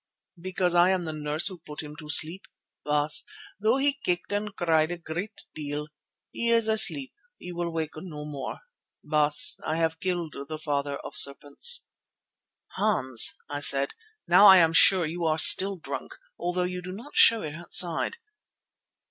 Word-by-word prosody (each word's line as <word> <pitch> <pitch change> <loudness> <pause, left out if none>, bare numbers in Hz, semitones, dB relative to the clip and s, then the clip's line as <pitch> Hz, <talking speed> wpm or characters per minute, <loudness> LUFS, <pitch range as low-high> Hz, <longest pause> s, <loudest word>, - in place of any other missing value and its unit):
"Because 180 -1 -2
I 175 +1 +3
am 190 -2 -1
the 160 -2 -6
nurse 150 +1 -1
who 185 -3 0
put 150 0 -9
him 150 0 -11
to 150 -1 -12
sleep, 160 +5 +3 0.4
Baas, 150 0 -1 0.4
though 220 +5 +1
he 280 +1 0
kicked 180 +2 -3
and 205 0 -4
cried 160 -3 0
a 175 - -5
great 175 +6 -8
deal. 150 0 -7 0.4
He 235 - -3
is 230 -1 +2
asleep; 240 +5 +2 0.2
he 180 - -10
will 170 0 -4
wake 160 -2 -4
no 155 -3 -9
more. 145 -3 -8 0.4
Baas, 150 -1 +2
I 155 - -3
have 160 0 -2
killed 175 -4 -4
the 155 - -7
Father 145 -2 -4
of - - -11
Serpents." 145 - +2 0.9
"Hans," 135 - +2
I 145 - -6
said, 140 -1 +4 0.3
"now 205 - +6
I 190 - +8
am 165 -2 +3
sure 180 +1 +5
that 155 - -5
you 170 0 -5
are 155 -1 0
still 195 +4 +5
drunk, 165 - -8 0.2
although 180 +1 -3
you 180 0 -5
do 185 +1 -9
not 240 +9 -12
show 230 -1 +5
it 150 -2 -7
outside." 170 - +1
170 Hz, 170 wpm, -25 LUFS, 150-190 Hz, 0.9 s, I